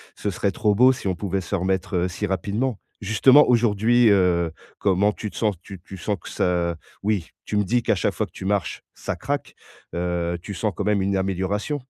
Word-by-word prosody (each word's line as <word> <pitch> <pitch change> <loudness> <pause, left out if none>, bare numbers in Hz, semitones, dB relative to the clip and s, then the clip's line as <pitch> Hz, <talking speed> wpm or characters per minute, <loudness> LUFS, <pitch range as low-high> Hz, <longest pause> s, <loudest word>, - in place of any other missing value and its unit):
ce 105 - -3
serait 100 +1 -1
trop 105 +2 +1
beau 130 +5 +6
si 105 -6 -4
on 90 - -1
pouvait 95 0 -2
se 90 - -8
remettre, 95 +1 -1
heu, - - 0
si 90 +3 -3
rapidement. 100 +6 -1 0.2
Justement 125 +8 +6
aujourd'hui, 115 0 +4
heu, 90 -4 +3 0.3
comment 100 +1 +3
tu 105 0 -6
te - - -16
sens, 105 -4 0
tu 95 -2 -11
tu 95 - -10
sens 100 +3 -2
que - - -9
ça 85 -2 0 0.3
oui 100 -6 0 0.2
tu 105 - -2
me 105 - +3
dis 120 +4 +1
qu'à - - +2
chaque - - 0
fois - - -1
que - - -19
tu 95 - -9
marches 100 -4 -1
ça - - -5
craque, - - -3 0.4
heu, 85 0 -1
tu 100 - -7
sens 100 +4 -1
quand 100 - -4
même 105 -2 +2
une 95 0 0
amélioration? 95 +9 -1
100 Hz, 215 wpm, -23 LUFS, 90-105 Hz, 0.4 s, beau